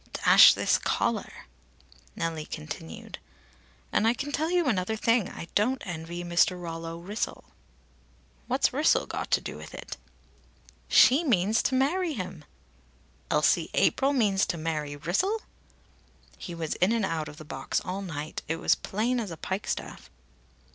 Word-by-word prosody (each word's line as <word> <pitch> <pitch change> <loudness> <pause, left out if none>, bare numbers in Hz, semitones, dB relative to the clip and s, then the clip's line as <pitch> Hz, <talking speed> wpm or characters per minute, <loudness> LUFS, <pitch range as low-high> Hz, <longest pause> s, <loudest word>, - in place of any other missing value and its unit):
"Dash - - +8
this - - +2
collar!" - - -2 0.7
Nellie 160 -2 -3
continued: 80 +1 -8 0.7
"And 220 - +2
I 235 - +3
can 285 +3 -4
tell 310 +3 0
you 350 -1 +2
another 220 -4 0
thing. 230 -1 +2
I 170 - -8
don't 250 +6 +2
envy 170 -1 -5
Mr. 175 +1 +2
Rollo 165 -1 -6
Wrissel." 200 +6 -4 1.0
"What's 260 +1 +1
Wrissel 295 +4 +3
got - - -4
to - - +2
do - - -7
with - - -10
it?" - - -8 0.9
"She 275 +7 +6
means 220 - +2
to 260 - 0
marry 320 +6 +1
him." 185 - -6 0.8
"Elsie - - +2
April 270 +1 +3
means 210 -8 +2
to 170 - -2
marry 155 -2 -3
Wrissel?" 370 - 0 0.9
"He 175 - -8
was 160 -2 -3
in 185 +4 +4
and 225 -4 +1
out 160 -4 -3
of 150 - -12
the 155 - -10
box 135 -2 -2
all 185 +2 -4
night. 155 -5 -5
It 165 - -1
was 165 - 0
as - - -6
plain 235 +5 -1
as 220 -4 -4
a 165 - -7
pikestaff." 190 +6 -4
190 Hz, 155 wpm, -27 LUFS, 165-250 Hz, 1.0 s, Dash